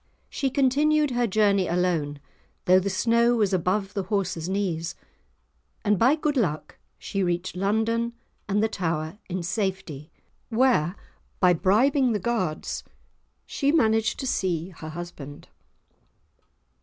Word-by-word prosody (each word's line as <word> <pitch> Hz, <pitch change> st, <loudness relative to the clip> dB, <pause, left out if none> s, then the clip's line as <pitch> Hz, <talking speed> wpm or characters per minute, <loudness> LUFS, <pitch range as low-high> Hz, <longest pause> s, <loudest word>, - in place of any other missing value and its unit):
She 270 Hz, -, -1 dB
continued 290 Hz, +2 st, +2 dB
her 245 Hz, -1 st, +1 dB
journey 200 Hz, -2 st, +2 dB
alone, 165 Hz, -5 st, 0 dB, 0.5 s
though 185 Hz, +1 st, +6 dB
the 195 Hz, +2 st, -2 dB
snow 235 Hz, +4 st, +3 dB
was 210 Hz, -4 st, +1 dB
above 190 Hz, +3 st, 0 dB
the 200 Hz, -, -1 dB
horse's 185 Hz, -3 st, -2 dB
knees, 175 Hz, -4 st, -2 dB, 0.9 s
and 205 Hz, -2 st, +2 dB
by 260 Hz, +6 st, +5 dB
good 300 Hz, -1 st, -1 dB
luck 170 Hz, -, -2 dB, 0.2 s
she 195 Hz, -, -3 dB
reached 175 Hz, 0 st, -1 dB
London 225 Hz, +5 st, 0 dB, 0.4 s
and 205 Hz, +2 st, +2 dB
the -, -, +3 dB
Tower 165 Hz, -2 st, -3 dB
in 180 Hz, -1 st, -3 dB
safety, 180 Hz, -6 st, -3 dB, 0.4 s
where, 225 Hz, -8 st, +2 dB, 0.4 s
by 180 Hz, -2 st, +5 dB
bribing 245 Hz, -, +3 dB
the 210 Hz, -, 0 dB
guards, 185 Hz, -7 st, -2 dB, 0.6 s
she 280 Hz, -1 st, 0 dB
managed 225 Hz, -8 st, +2 dB
to -, -, -4 dB
see 180 Hz, -8 st, -1 dB
her 160 Hz, -3 st, -9 dB
husband. 155 Hz, -4 st, -9 dB
195 Hz, 130 wpm, -25 LUFS, 175-235 Hz, 0.9 s, though